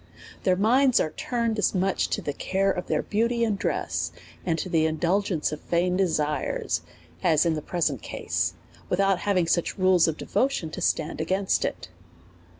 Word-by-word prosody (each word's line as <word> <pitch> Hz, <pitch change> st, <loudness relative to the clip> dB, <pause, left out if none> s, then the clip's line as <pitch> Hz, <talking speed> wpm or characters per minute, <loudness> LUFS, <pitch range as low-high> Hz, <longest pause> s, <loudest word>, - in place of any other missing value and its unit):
Tlieir 185 Hz, -2 st, +3 dB
minds 250 Hz, +5 st, +4 dB
are 155 Hz, -, 0 dB
turned 230 Hz, 0 st, -2 dB
as 210 Hz, -, +1 dB
much 190 Hz, +1 st, +1 dB
to -, -, -2 dB
the 145 Hz, -, -2 dB
care 195 Hz, +6 st, 0 dB
of 180 Hz, -, -4 dB
their -, -, 0 dB
beauty 235 Hz, +3 st, 0 dB
and 220 Hz, -3 st, +1 dB
dress, -, -, -1 dB, 0.3 s
and 165 Hz, -2 st, 0 dB
the 165 Hz, -2 st, +1 dB
indulgence 170 Hz, +1 st, 0 dB
of 150 Hz, -, -6 dB
vain 180 Hz, +1 st, +1 dB
desires, 155 Hz, -5 st, 0 dB, 0.4 s
as 165 Hz, -3 st, +3 dB
in 165 Hz, -, +2 dB
the 155 Hz, -, -3 dB
present 150 Hz, -, -1 dB
case, -, -, -2 dB, 0.3 s
without 195 Hz, 0 st, +2 dB
having 190 Hz, -4 st, +1 dB
such 170 Hz, +1 st, 0 dB
rules 185 Hz, -2 st, +4 dB
of 160 Hz, -, -1 dB
devotion 255 Hz, -, -1 dB
to -, -, -6 dB
stand 160 Hz, -1 st, 0 dB
against 190 Hz, +4 st, +1 dB
it. -, -, -4 dB
180 Hz, 165 wpm, -26 LUFS, 160-200 Hz, 0.4 s, minds